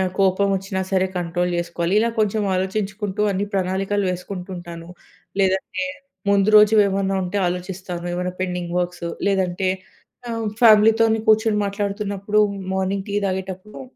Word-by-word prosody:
ఆహ్, 185 -1 0
కోపం 195 +1 +3
వచ్చినా 190 0 -3
సరే 190 0 +3
కంట్రోల్ 175 +1 -1
చేసుకోవాలి. 170 +1 -1
ఇలా 230 +1 +1
కొంచెం 215 0 +1
ఆలోచించుకుంటూ 205 +2 -2
అన్ని 195 +2 -1
ప్రణాళికలు 195 +1 0
వేసుకుంటూ 180 +1 -6
ఉంటాను. 170 -1 -9 0.5
లేదంటే 190 +7 0 0.5
ముందు 200 0 +3
రోజు 210 +1 +7
ఏమన్నా 195 0 0
ఉంటే 185 +3 -4
ఆలోచిస్తాను. 180 -1 -5
ఏమన్నా 180 +1 -2
పెండింగ్ 180 -1 -3
వర్క్స్ 175 -1 -4 0.2
లేదంటే 190 -1 0 0.6
ఆహ్, 225 -1 -3 0.2
ఫ్యామిలీతోనే 225 0 +6
కూర్చొని 220 -1 +4
మాట్లాడుతున్నప్పుడు 200 0 -1 0.3
మార్నింగ్ 190 +1 -1
టీ - - -3
తాగేటప్పుడు 190 +3 -5
190 Hz, 130 wpm, -22 LUFS, 180-205 Hz, 0.6 s, రోజు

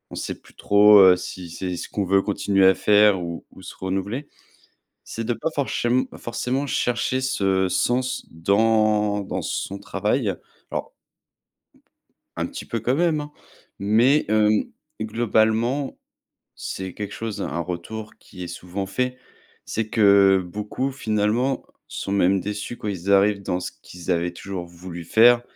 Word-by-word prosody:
sait - - -4
plus - - -21
trop, 105 0 +6
heu, 95 -1 +8
si 90 -1 -7
c'est 90 +1 -4
ce - - -6
qu'on 100 -2 -2
veut 95 +1 +3
continuer 100 -1 +1
à 95 - +5
faire 105 -2 +4
ou 85 -1 -6
ou - - -14
se - - -10
renouveler, 95 +9 -3 0.8
c'est 115 - -5
de 120 - 0
pas 160 - -3
forchém 130 -3 0
forcément 130 +4 -2
chercher 125 0 0
ce 95 -8 +1
sens 125 +6 0
dans 105 +3 +2
dans 100 - -4
son 100 - -3
travail. 105 +2 -1 0.4
Alors - - -4 1.5
un - - -1
petit - - -7
peu 115 - -3
quand 125 +4 0
même, 165 -1 +2
hein, 150 0 -8 0.5
mais, 115 +9 +4
hem, 110 0 +3 0.4
globalement, 115 +4 +1 0.6
c'est 95 -1 -6
quelque 105 -1 -6
chose 110 -3 -5
un 85 - -3
retour, 90 +6 -6
qui 90 -2 -12
est 85 - -7
souvent 90 +2 -5
fait, 125 +6 -2 0.5
c'est 110 -1 -2
que 100 -3 +5
beaucoup 105 +8 -3
finalement, 115 +1 0 0.2
sont 100 - -5
même 95 0 +3
déçus 105 +5 -5
quand 105 - -5
ils 100 0 -1
arrivent 100 0 +4
dans 90 -1 -2
ce - - -4
qu'ils 90 +1 -8
avaient 85 0 0
toujours 90 0 -6
voulu 85 0 -9
faire, 120 +6 +5
105 Hz, 150 wpm, -23 LUFS, 95-115 Hz, 1.5 s, heu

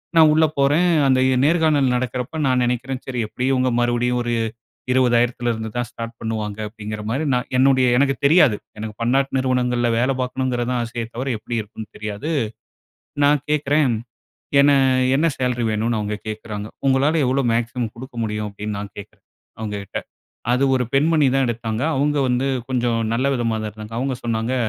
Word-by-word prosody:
நா 165 - +7
உள்ள 160 +1 +5
போறேன். 145 +6 +3 0.2
அந்த 130 -1 +4
இ 130 - +2
நேர்காணல் 155 -4 +3
நடக்கறப்ப 125 +4 -3
நான் 130 -1 +2
நெனைக்கிறேன் 125 +2 -2
"சரி 125 -2 -3
எப்டியும் 130 +5 -1
இவங்க 130 0 +2
மறுபடியும் 120 0 +1
ஒரு 120 0 -1 0.6
20,000 120 -2 +1
தான் 120 -1 -1
ஸ்டார்ட் 115 0 -7
பண்ணுவாங்க." 110 -2 -4
அப்டீங்கிற 105 -1 -7
மாரி 140 +6 -1
நா 125 - +3 0.2
என்னுடைய 130 -1 +4
எனக்குத் 135 -1 +1
தெரியாது. 150 - +5 0.2
எனக்கு 110 0 -6
பன்னாட்டு 135 +3 +1
நிறுவனங்கள்ல 125 -2 +1
வேல 130 +3 +2
பார்க்கணுங்கிறது 125 -1 -1
தான் 125 -1 0
ஆசையே 115 0 -4
தவர, 130 +3 -3
எப்டி 120 +2 -5
இருக்கும்ன்னு 105 +1 -10
தெரியாது. 105 +9 -4 0.9
நான் 145 -1 +4
கேட்குறேன், 145 -3 +2 0.7
என்னை, 140 0 +5 0.4
என்ன 160 - +2
சேலரி 125 -2 0
வேணுன்னு 110 +1 0
அவங்க 105 0 -2
கேட்குறாங்க. 105 -1 -6 0.2
"உங்களால 135 +4 +3
எவ்வளோ 135 +1 +1
மேக்ஸிமம் 120 -1 -2
குடுக்க 125 +1 -10
முடியும்?" 105 0 -3
அப்டீன்னு 105 +1 -5
நா - - -4 0.2
கேட்குறேன், 100 - -13 0.3
அவங்ககிட்ட. 105 -3 -5 0.5
அது 125 +2 +2
ஒரு 125 - +1
பெண்மணி 150 +2 +3
தான் 135 -1 +2
எடுத்தாங்க. 115 0 -3
அவங்க 145 +2 +1
வந்து 125 +1 +1 0.2
கொஞ்சம் 120 -3 0
நல்ல 125 +3 0
விதமா 115 -3 0
தான் 110 - -3
இருந்தாங்க. 110 +1 -10
அவங்க 130 +2 -1
சொன்னாங்க, 115 +1 -1
125 Hz, 160 wpm, -21 LUFS, 115-135 Hz, 0.9 s, நா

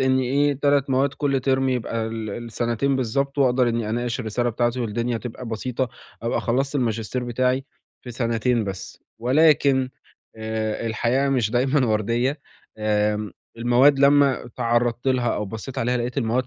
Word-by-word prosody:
إنّ 130 0 +3
إيه، 140 +3 +2
3 140 -1 +2
مواد 135 +2 +1
كل 140 -3 0
ترم 135 0 +1
يبقى 115 -3 -1
ال 110 -2 -5
السَنتين 120 +4 -1
بالضبط، 140 +3 -1
وأقدر 125 -2 +3
إنّي 115 -2 -1
أناقش 120 +2 -2
الرسالة 120 +2 -1
بتاعتي 120 +2 0
والدنيا 115 +1 -1
تبقى 125 +1 -7
بسيطة، 120 +3 -2 0.3
أبقى 115 - 0
خلّصت 135 +4 -1
الماجستير 120 -1 -1
بتاعي 125 +2 0 0.4
في 125 - -8
سَنتين 115 -1 0
بس. 95 -1 -7 0.2
ولكن 135 0 +3 0.5
آآ 110 0 -3
الحياة 120 +5 +1
مش 125 -6 +1
دايمًا 130 +3 +2
ورديّة 115 +6 0 0.4
آمم 105 -1 0 0.2
المواد 125 +4 +4
لمّا 140 -2 +4
اتعرّضت 120 +1 -1
لها 125 -2 +1
أو 105 - -2
بصّيت 110 +6 -7
عليها 125 +2 +1
لقيت 125 +3 -2
المواد 120 +1 0
120 Hz, 150 wpm, -23 LUFS, 115-130 Hz, 0.5 s, المواد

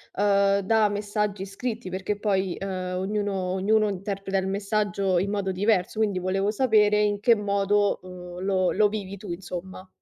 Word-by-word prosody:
ehm, 200 0 +3
da 215 +2 +3
messaggi 205 -1 -2
scritti 215 +1 -5
perché 190 +3 -3
poi, 195 -3 0
ehm, 185 -2 -4
ognuno 205 +1 -1 0.2
ognuno 210 +3 +2
interpreta 195 0 -3
il 190 0 -1
messaggio 200 -1 0
in 195 +3 -1
modo 200 -2 -1
diverso, 200 +1 +1
quindi 205 -4 +1
volevo 190 +2 0
sapere 210 -2 +3
in 205 -1 +1
che 230 +3 +5
modo, 205 0 +1
uhm, 180 -1 -9
lo 185 -2 +2
lo 210 +1 +4
vivi 200 -2 -5
tu, 195 -1 -8
insomma. 185 +1 -7
200 Hz, 160 wpm, -25 LUFS, 190-210 Hz, 0.2 s, che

